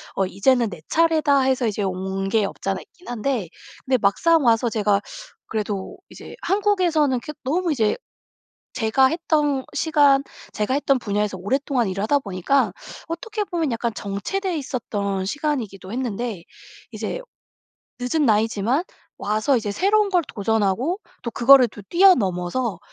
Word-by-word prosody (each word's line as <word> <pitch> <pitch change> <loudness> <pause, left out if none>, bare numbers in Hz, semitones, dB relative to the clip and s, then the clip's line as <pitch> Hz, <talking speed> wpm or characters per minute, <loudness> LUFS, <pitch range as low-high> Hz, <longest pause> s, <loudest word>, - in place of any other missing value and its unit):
'어 195 - +1
이제는 230 +5 +2
내 175 -5 -10
차례다.' 315 -4 +3
해서 260 -2 +1
이제 210 -1 -2
온 190 +1 -2
게 215 0 +2
없지 195 - -5
않아 195 - -1
있긴 355 - -20
한데 240 -5 -2 0.4
근데 260 -1 +2
막상 285 +10 +3
와서 230 0 +3
제가 205 -2 +1 0.5
그래도 205 -3 -4
이제 - - -11
한국에서는 350 -9 +2
그 300 - -7
너무 335 +6 0
이제 230 - +1 0.8
제가 245 +3 +3
했던 295 -3 0
시간 290 -4 +4 0.3
제가 210 +5 -1
했던 275 -1 +2
분야에서 205 -3 -1
오랫동안 250 +4 0
일을 195 +1 -3
하다 285 +7 +3
보니까 205 +2 0 0.4
어떻게 420 +6 -3
보면 335 -7 -2
약간 230 0 -1
정체돼 330 - -3
있었던 205 -8 -3
시간이기도 220 -6 -3
했는데 235 -5 -3 0.5
이제 - - -4 0.8
늦은 270 +5 0
나이지만 225 - +2 0.3
와서 215 +6 +1
이제 215 -4 -1
새로운 405 - +2
걸 360 -3 +3
도전하고 225 - 0 0.2
또 235 - -3
그거를 250 +1 +6
또 205 - -11
뛰어넘어서 225 - +3
245 Hz, 315 characters per minute, -22 LUFS, 205-295 Hz, 0.8 s, 그거를